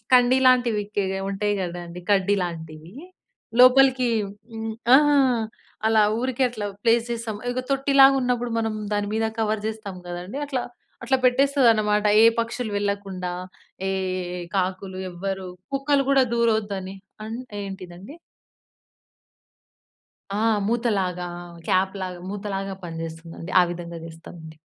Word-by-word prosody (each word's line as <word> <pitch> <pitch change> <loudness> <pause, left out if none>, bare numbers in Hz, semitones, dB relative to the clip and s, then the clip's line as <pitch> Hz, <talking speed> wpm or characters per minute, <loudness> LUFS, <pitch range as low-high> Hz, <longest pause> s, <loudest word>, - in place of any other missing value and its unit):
కండీ 250 +1 +6
లాంటివి 245 -4 +4
కే 205 - +3 0.3
ఉంటాయి 205 +1 -1
కదండీ 175 -1 -5
కడ్డీ 200 0 +3
లాంటివి. 160 -1 -6 0.7
లోపలికి 255 0 +6 0.4
హ్మ్. 225 0 -4 0.2
ఆహా! 295 +1 +6 0.7
అలా 220 -1 +5 0.2
ఊరికే 255 +1 -1
అట్లా 215 -4 -5 0.2
ప్లేస్ 230 0 +3
జేస్తాం. 230 -2 -3
ఇగ 250 +1 -1
తొట్టిలాగున్నప్పుడు 270 -3 +4
మనం 225 -1 -1 0.2
దాని 205 0 0
మీద 225 0 +1
కవర్ 215 -1 0
జేస్తాం 215 -3 -5
గదండీ. 175 +8 -6
అట్లా, 265 -4 -2 0.4
అట్లా 265 +3 +3
పెట్టేస్తదనమాట. 240 -6 +3 0.2
ఏ - - +8 0.2
పక్షులు 230 0 -3
వెళ్ళకుండా, 200 -3 -3 0.6
ఏ - - 0 0.5
ఏ - - -5 0.2
కాకులు 185 0 -2
ఎవ్వరు 190 +1 -4 0.3
కుక్కలు 275 0 +2
గూడా 270 -2 +5
దూరొద్దని. 210 -5 0 0.3
అన్ 225 +2 -5 0.2
ఏంటిదండి? 190 - -9 2.2
ఆహ్! 220 -1 +2
మూతలాగా 200 -6 0 0.4
క్యాప్‌లాగా 185 -1 0
మూతలాగా 195 -1 -4
పనిజేస్తుందండి. 165 +1 -7
ఆ - - +6
విధంగా 170 -1 -6
జేస్తామండి. 160 -1 -11
210 Hz, 110 wpm, -24 LUFS, 185-245 Hz, 2.2 s, ఏ